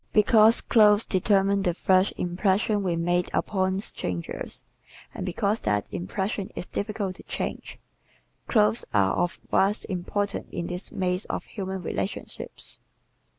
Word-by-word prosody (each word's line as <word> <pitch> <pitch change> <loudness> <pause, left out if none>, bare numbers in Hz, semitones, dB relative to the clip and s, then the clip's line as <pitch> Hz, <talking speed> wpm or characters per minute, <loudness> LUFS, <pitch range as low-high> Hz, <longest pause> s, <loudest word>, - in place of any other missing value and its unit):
Because 220 +1 +6
clothes 210 -1 +5
determine 195 +1 +2
the 175 -3 0
first 185 +1 +3
impressions 195 +4 +1
we 175 -3 0
make 175 +1 0
upon 190 -1 0
strangers 90 - -4 0.5
and - - -5
because 200 +4 0
that 105 -1 0
impression 190 - -3
is - - -4
difficult 200 -2 -3
to - - -13
change, - - -5 0.7
clothes 220 0 +3
are 95 -2 +4
of 175 - -1
vast 200 +3 +2
importance 195 +2 -2
in 170 - -3
this 180 +2 -5
maze 185 +1 -1
of - - -3
human 190 -3 -5
relationships. 190 - -5
190 Hz, 130 wpm, -26 LUFS, 175-205 Hz, 0.7 s, Because